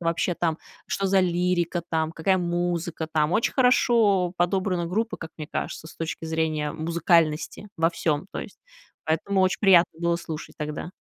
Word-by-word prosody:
вообще 170 +1 0
там, 165 -2 0 0.3
что 195 - -1
за 195 0 +4
лирика 175 -1 0
там, 160 0 0
какая 185 +4 +1
музыка 175 -2 -2
там. 155 +1 +2
Очень 225 - +1
хорошо 225 -8 +3
подобрана 180 0 0
группа, 220 +6 -1
как 160 - -8
мне 155 -2 -7
кажется, - - -4
с - - -14
точки 165 0 -4
зрения 160 -2 -1
музыкальности 165 +2 +1
во 165 +1 +2
всём, 155 0 -1
то - - -4
есть - - -8 0.5
поэтому 190 +5 0
очень 185 0 +2
приятно 175 -5 +5
было 170 0 +2
слушать 160 -2 -7
тогда. 150 +3 -5
170 Hz, 165 wpm, -25 LUFS, 160-185 Hz, 0.5 s, приятно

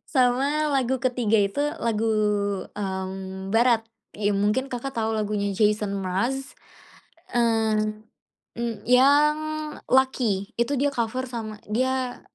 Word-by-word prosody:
Sama 250 0 +3 0.3
lagu 265 -1 +1
ketiga 240 -3 +2
itu 200 +8 -2 0.2
lagu, 225 -1 0 0.7
mmm, 190 -1 -4
barat. 235 0 +4 0.4
Ya, 205 0 +1
mungkin 210 +7 0
Kakak 250 +1 -5
tahu 225 0 0
lagunya 210 -2 -1
Jason 210 0 +1
Mraz, 235 +9 -2 0.8
mmm, 220 -2 +1 0.6
e - - -3 0.2
yang 285 +5 +5 0.5
Lucky. 245 -7 +1
Itu 275 +4 0
dia 280 +2 +1
cover 240 +2 -2
sama 225 -4 -6
dia 255 +3 -1
225 Hz, 110 wpm, -25 LUFS, 210-255 Hz, 0.8 s, yang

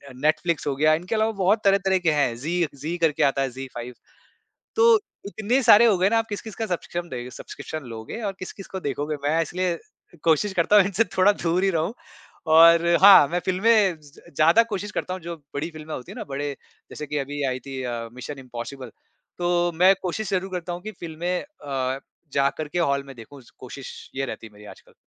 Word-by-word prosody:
Netflix 155 +4 0
हो 140 - 0
गया, 155 +3 +4
इनके 175 +7 -2
अलावा 220 +1 +2
बहुत 210 +4 +3
तरह-तरह 195 -1 +3
के 170 -3 +2
हैं, 140 -6 +1
जी 170 +5 -1
जी 155 +5 -4
करके 165 -3 +1
आता 135 0 +2
है, 135 - 0
जी 135 +2 -7
फाइव, 120 +1 -7 0.8
तो 460 -1 +6 0.3
इतने 220 +6 0
सारे 225 -1 +7
हो 215 -4 +4
गए 185 +2 +3
ना 230 - +3
आप 225 - -1
किस-किस 210 +1 -6
का 225 - -3
सब्स्कृम 175 -2 -4
दे 125 -4 -6
सब्सक्रिप्शन 155 +4 -8
लोगे 115 - -7
और 200 -2 -2
किस-किस 185 +1 -8
को 190 - -6
देखोगे? 145 0 -3
मैं 155 +3 +2
इसलिए 175 +1 -2 0.4
कोशिश 165 +5 +2
करता 180 +4 +3
हूँ 205 - +7
इनसे 200 +3 +1
थोड़ा 190 +2 +5
दूर 175 -1 0
ही 195 - +3
रहूँ 165 +2 -1 0.6
और 165 +1 +7 0.2
हाँ, 195 -7 +9
मैं 175 - -1
फ़िल्में 195 0 +3
ज 145 -2 -18 0.2
ज़्यादा 165 +9 +6
कोशिश 205 +1 -3
करता 185 - -3
हूँ, 185 - -7
जो 170 +1 -6 0.2
बड़ी 150 +4 -3
फ़िल्में 155 -1 -8
होती 125 - -8
हैं - - -11
ना, - - -5
बड़े 140 +1 -3 0.4
जैसे 150 - -7
कि 150 +1 -2
अभी 145 +1 -4
आई 130 0 -2
थी 135 -1 -5
अ, 120 -2 -4
मिशन 130 +3 -8
इम्पॉसिबल, 130 0 -8 0.5
तो 175 0 +1
मैं 185 +3 +6
कोशिश 190 +2 -3
ज़रूर 190 0 -1
करता 180 -1 -4
हूँ 175 +1 -6
कि 215 +2 -6
फ़िल्में 170 +1 -4
अ, 135 - -4 0.3
जाकर 140 +3 0
के 165 - -3
हॉल 140 -5 +1
में 135 -1 -11
देखूँ, 130 +5 -12 0.2
कोशिश 130 +1 -10
ये 135 - 0
रहती 115 - -7
है 110 - -15
मेरी 105 0 -15
आजकल। - - -22
165 Hz, 210 wpm, -24 LUFS, 140-190 Hz, 0.8 s, हाँ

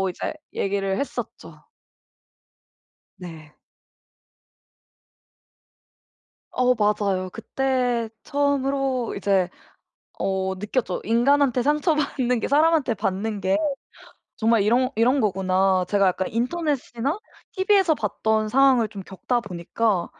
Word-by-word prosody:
라고 190 - +1
이제 175 - -4 0.2
얘기를 195 -1 -1
했었죠. 280 - -6 1.6
네. 160 -4 -11 3.0
어 250 0 +2
맞아요. 205 -4 0
그때 250 -3 -1
처음으로 275 -3 0
이제 195 -2 +1 0.7
어 190 0 -1
느꼈죠. 210 +1 -2
인간한테 250 +2 +2
상처받는 290 -4 +1
게 - - -2
사람한테 300 -3 +3
받는 205 +1 -3
게 190 +1 +2 0.8
정말 225 -1 +2
이런 245 +5 +2
이런 250 +5 +3
거구나. 190 -2 +1
제가 200 -1 +3
약간 185 +1 0
인터넷이나 275 - -2 0.4
TV에서 380 -4 +3
봤던 215 -1 -1
상황을 255 -2 +4
좀 200 -2 -8
겪다 195 +6 -2
보니까 190 0 -2
230 Hz, 225 characters per minute, -23 LUFS, 195-270 Hz, 3.0 s, 상황을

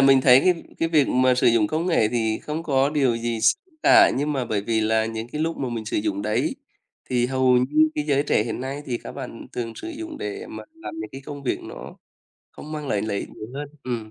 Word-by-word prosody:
mình 135 -1 +6
thấy 130 0 +7
cái 180 0 +2 0.2
cái 165 - +1
việc 150 -4 +3
mà 130 0 +3
sử 125 - +2
dụng 115 -3 +4
công 160 +7 -1
nghệ 140 -12 +3
thì 110 -2 0
không 155 +2 -4
có 140 -2 +2
điều 135 -6 +2
gì 115 -1 -2
x 115 0 +6 0.3
cả, 355 -1 +7
nhưng 150 +2 0
mà 130 -3 -1
bởi 105 -3 -1
vì 110 0 0
là 110 0 +2
những 115 +1 -5
cái 150 - -3
lúc 165 +1 -1
mà 130 - -2
mình 115 -2 -4
sử - - -3
dụng 105 -1 -1
đấy 105 0 0 0.6
thì 125 -1 +2
hầu 130 -1 +3
như 150 +5 +3
cái 150 - -1
giới 140 -1 +2
trẻ 125 - +2
hiện 115 +1 -4
nay 135 +3 -4
thì 120 -2 -2
các - - -9
bạn 125 -4 -8
thường 115 -2 -4
sử 335 - -7
dụng 325 -1 -7
để 410 +2 -5
mà - - -8
làm 325 0 -8
những - - -6
cái 135 - -7
công 145 -1 -7
việc 130 - -1
nó - - -9 0.5
không 155 - -10
mang 150 -2 -5
lại 100 -1 0
lợi 110 -2 -2
ích - - -5
nhiều 110 - -9
hơn 145 0 -5
ừm, 115 -4 -4
130 Hz, 255 wpm, -24 LUFS, 115-150 Hz, 0.6 s, thấy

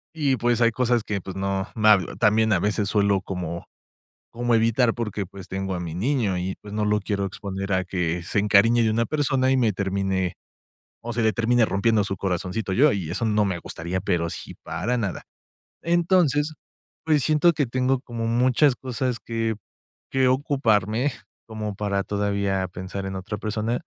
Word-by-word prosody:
Y, 140 -5 +1
pues, 120 +1 +1
hay 115 0 +5
cosas 120 -1 +1
que, 100 -3 -3
pues, 95 +1 -8
no 95 0 -2
hablo. 105 -5 +4
También 110 +1 +3
a 95 - +3
veces 105 +1 0
suelo 100 -2 +2
como 85 -3 -5 0.7
como 120 0 -1
evitar 115 +1 +2
porque, 105 -4 -3
pues, 95 0 -11
tengo 95 0 -3
a - - -4
mi 85 -2 -5
niño 110 -1 0
y, 90 +1 -3
pues, 105 0 -9
no 105 0 0
lo 105 0 +2
quiero 100 0 -2
exponer 95 0 -4
a 95 0 +1
que 90 -2 -2
se 100 - 0
encariñe 110 +3 +4
de 110 - +2
una 115 +2 +1
persona 135 -3 +1
y 135 - +3
me 115 -4 +2
termine 95 -1 -1 0.7
o 120 +1 -5
se 115 - -1
le 110 0 +3
termine 115 +1 +3
rompiendo 105 +1 +2
su 95 0 -3
corazoncito 95 +3 -2
yo, 135 +8 +5
y 90 -6 -3
eso 105 +6 -2
no 105 -1 +2
me 95 -3 -1
gustaría, 85 +2 -4
pero 85 -3 0
sí - - -7
para 95 +10 -2
nada. 100 - -3 0.6
Entonces, 170 -4 +2 0.5
pues, 155 -2 +3
siento 155 +4 +4
que 145 -5 0
tengo 130 +2 +1
como 120 -3 -5
muchas 125 +4 +3
cosas 125 -1 -3
que 115 -1 -1 0.5
que 130 -1 +2
ocuparme 125 -2 +1 0.3
como 110 -2 -4
para 100 -1 -1
todavía 100 -2 -1
pensar 95 +2 -6
en 95 0 -4
otra 95 +2 -5
persona. 110 +3 -2
105 Hz, 180 wpm, -24 LUFS, 95-120 Hz, 0.7 s, hay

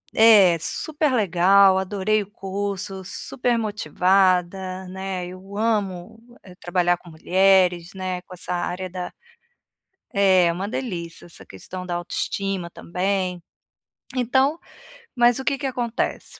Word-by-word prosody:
É, 205 -6 +7
super 300 - -1
legal, 195 -1 +5
adorei 200 +2 0
o 200 - -19
curso, 195 -1 -4
super 240 +5 -2
motivada, 185 -1 +1
né, 190 -1 -5
eu 190 +3 -10
amo 205 -3 -1 0.4
trabalhar 175 0 +1
com 175 -1 -16
mulheres, 180 +1 +2
né, 185 -1 -4
com 185 - -14
essa 180 0 -5
área 180 +1 -3
da 180 0 -6 1.0
É, 190 -3 +5
é 170 - +2
uma 190 +4 -4
delícia. 175 -10 -5
Essa 170 - -11
questão 180 - -9
da 175 -1 -3
autoestima 185 +1 -3
também, 180 0 -2 0.7
então 265 +6 +2 0.6
mas 240 0 +4
o 265 - -4
que 280 -1 +1
que 275 - -2
acontece? 240 -2 -3
190 Hz, 125 wpm, -23 LUFS, 180-205 Hz, 1.0 s, É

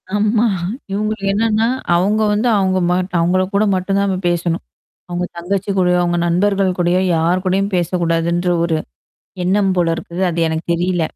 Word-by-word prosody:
ஆமா. 215 +2 +2 0.5
இவுங்களுக்கு 210 0 -2
என்னான்னா, 220 +1 +1 0.3
அவுங்க 205 +5 +2
வந்து 215 +4 +1
அவுங்க 190 -1 +1
மாட்டு 180 +1 -1
அவுங்கள 180 +3 +2
கூட 200 +2 +3
மட்டும் 185 +2 -1
தான் 200 0 +1
நம்ம 190 -1 -1
பேசணும். 175 0 -1 0.5
அவுங்க 175 0 -2
தங்கச்சி 195 +3 -2
கூடயோ, 180 -1 +3
அவுங்க 175 0 0
நண்பர்கள் 190 +1 +1
கூடயோ, 175 +1 +2
யார் 175 +3 +1
கூடயும் 195 +2 0
பேசக்கூடாதுன்ற 170 0 0
ஒரு 165 -2 0 0.7
எண்ணம் 195 +1 +2
போல 170 -2 +2
இருக்குது. 170 +2 -5
அது 170 0 -2
எனக்கு 160 +1 -3
தெரியல. 175 0 0
185 Hz, 155 wpm, -18 LUFS, 175-200 Hz, 0.7 s, கூட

